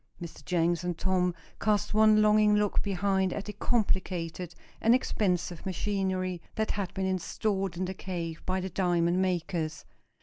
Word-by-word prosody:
Mr. 170 -2 -9
Jenks 175 0 +1
and 175 -2 -2
Tom 180 -1 +1 0.2
cast 210 -1 +1
one 215 0 +6
longing 210 0 +5
look 210 -1 +1
behind 190 -1 +1
at 205 - -4
the 210 - -6
complicated 185 -7 -1 0.3
and 230 +2 +5
expensive 180 -9 -1
machinery 185 -2 -1
that 220 -1 0
had 200 -3 -3
been 190 - -1
installed 190 0 -1
in 185 - -1
the 185 - -4
cave 170 -4 -5
by 185 0 -1
the 190 +1 -3
diamond 175 -1 +2
makers. 170 -3 -2
185 Hz, 155 wpm, -29 LUFS, 175-205 Hz, 0.3 s, one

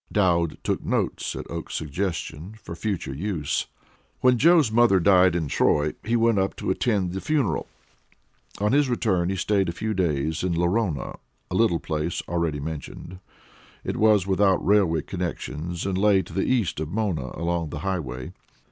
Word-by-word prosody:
Dowd 85 -5 +2
took - - -1
notes, - - -1
at - - -6
Oakes's 85 -1 -4
suggestion, 85 +3 -4
for 85 - -7
future 95 -7 -3
use. 80 -1 -2 0.5
When 125 -2 +4
Joe's 160 -5 +5
mother 115 -4 +5
died 90 -1 +5
in 80 -4 -1
Troy, 75 +2 +2
he 115 +2 0
went 115 -3 +3
up 95 0 0
to - - -2
attend 95 -3 0
the 95 - -4
funeral. 135 - 0 0.9
On 105 +1 +1
his 140 0 +3
return 95 -8 +1
he 95 - -1
stayed 95 0 +1
a - - 0
few 110 +5 -3
days 80 -4 0
in 90 -2 0
Lorona 85 -1 0 0.3
a - - -2
little 95 -6 +3
place 80 +1 -3
already 85 -4 -1
mentioned. 80 +4 -7 0.6
It - - -3
was 105 -4 +4
without 95 -1 +2
railway 95 -6 +3
connections 85 -2 -4
and 95 -1 -1
lay 100 -2 +4
to - - -12
the 95 - 0
east 110 - 0
of 80 -1 -3
Mona, 90 -9 -2
along 85 0 -1
the 75 - -6
Highway. 65 -10 -3
90 Hz, 165 wpm, -25 LUFS, 80-105 Hz, 0.9 s, Joe's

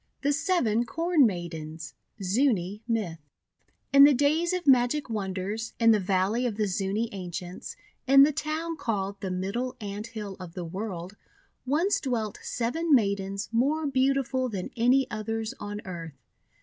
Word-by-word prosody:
THE 285 +1 +2
SEVEN 245 - +1
CORN 330 -5 +3
MAIDENS 160 -6 -6 0.3
Zuni 205 -2 +1
Myth 210 -9 -1 0.7
IN 280 0 +9
the 285 -1 +7
days 305 +6 +2
of 365 -2 -2
magic 255 0 +3
wonders, 200 +2 -3
in 230 -1 +6
the 215 - +4
Valley 195 +6 +1
of 220 - -3
the 215 - +1
Zuni 195 +3 -1
Ancients, 180 -1 -6 0.3
in 275 +1 +8
the 295 - +4
town 315 +3 -3
called 200 -5 -3
the 190 - -3
Middle 200 +8 -2
Ant 205 0 -5
Hill 210 -4 -7
of 180 -2 -9
the 180 -2 -4
WTorld, 185 0 -5 0.5
once 330 +9 +2
dwelt 230 -5 -2
seven 295 +7 +1
Maidens 200 -2 0
more 285 +7 +1
beautiful 265 -1 +1
than 195 -5 -5
any 250 +3 +4
others 220 +1 -3
on 205 0 -5
earth. 165 -6 -7
225 Hz, 150 wpm, -27 LUFS, 190-270 Hz, 0.7 s, IN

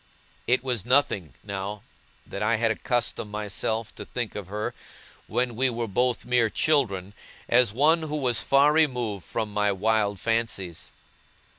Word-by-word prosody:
It 125 +1 +3
was 125 -6 -1
nothing, 120 - +1
now, 100 0 -5 0.4
that 100 - -7
I 110 +2 +2
had 115 +1 +2
accustomed 115 -2 -1
myself 105 +1 -2
to - - -8
think 120 -3 -4
of 100 -3 -6
her, 105 +2 -3 0.5
when 120 +1 -1
we 130 +3 +2
were 120 -1 -3
both 125 +5 0
mere 125 -2 +2
children, 105 -11 +1 0.3
as 120 -2 +4
one 150 +8 +3
who 150 -1 -2
was 125 -5 +2
far 140 +2 +4
removed 125 - +1
from 105 +5 -3
my 105 0 +2
wild 105 0 +1
fancies. 110 -7 -2
115 Hz, 150 wpm, -26 LUFS, 105-125 Hz, 0.5 s, as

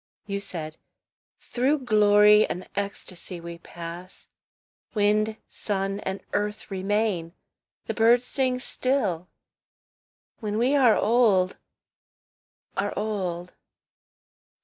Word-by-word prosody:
You 200 -1 -3
said, 160 -6 -6 0.6
"Through 265 +2 0
glory 210 -1 +6
and 180 - -5
ecstasy 190 -3 -4
we 170 0 -8
pass; 170 +2 -9 0.7
Wind, 215 +1 +2
sun, 195 -1 -2
and 190 -1 -4
earth 210 0 -2
remain, 195 -3 -1 0.5
the - - -2
birds 235 +2 +4
sing 255 -1 0
still, 250 -9 -1 1.1
When 210 -1 -3
we 250 +5 +3
are 250 -6 +5
old, 210 -6 +3 1.2
are - - -2
old. 185 -5 -3
205 Hz, 95 wpm, -26 LUFS, 185-225 Hz, 1.2 s, glory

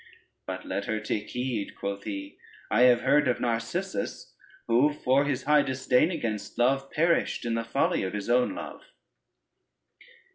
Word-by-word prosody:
But - - -5
let 100 - -3
her 110 0 -1
take 105 0 -3
heed," 125 -4 -3
quoth 100 0 -5
he, 100 -2 -6 0.3
"I 125 +3 +5
have 120 -1 +5
heard 145 +2 +3
of 125 - +1
Narcissus, 115 -2 -3 0.3
who 125 +6 +3
for 140 -1 +2
his 140 -3 -1
high 150 0 +5
disdain 130 +2 +2
against 115 - -4
Love, 135 +3 +2
perished 170 -5 +1
in 115 - -1
the 115 0 -1
folly 125 +5 0
of 95 - -3
his 105 -1 -4
own 125 +1 +2
love." - - -7
125 Hz, 155 wpm, -27 LUFS, 110-135 Hz, 0.3 s, I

